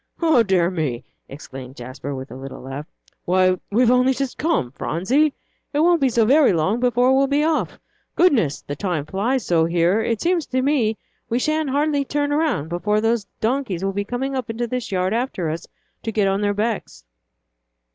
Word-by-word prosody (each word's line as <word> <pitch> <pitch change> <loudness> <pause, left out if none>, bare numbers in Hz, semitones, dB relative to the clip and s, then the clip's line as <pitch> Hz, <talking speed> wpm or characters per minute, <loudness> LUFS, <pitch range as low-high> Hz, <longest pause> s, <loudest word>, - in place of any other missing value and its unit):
"O 320 -7 +4
dear 185 -4 +2
me!" 150 -9 -2 0.3
exclaimed 135 -2 -9
Jasper, 130 +3 -7
with 130 +1 -8
a - - -8
little 135 +1 -8
laugh, 135 +3 -6 0.4
"why, 185 0 +3
we've 240 +3 +4
only 250 +1 +4
just 270 -1 -3
come, 295 - 0
Phronsie! 235 - +1 0.4
It 290 - +1
won't 340 -1 +4
be 270 - +4
so 230 -2 +2
very 275 -1 +5
long 180 +8 +1
before 250 +1 +3
we'll 275 +1 +3
be 285 +2 +1
off. 320 0 0 0.4
Goodness! 240 - +2
the 145 - -5
time 165 -3 -2
flies 220 +8 -1
so 165 -2 +3
here, 175 +5 +2
it 230 -1 -1
seems 345 -3 0
to 260 0 0
me 245 -7 +1 0.3
we 235 - +1
sha'n't 310 +2 0
hardly 285 +1 +1
turn 290 +1 -1
around 290 - 0
before 210 +5 0
those 225 -2 0
donkeys 225 -6 -1
will 195 - -1
be 205 +1 -1
coming 250 +6 -3
into 240 -2 -3
this 250 -2 -4
yard 185 +1 0
after 225 - -1
us 165 - -6 0.3
to 225 - -3
get 210 -2 +1
on 195 +1 0
their 205 -1 0
backs." 205 - -3
220 Hz, 185 wpm, -22 LUFS, 175-270 Hz, 0.4 s, very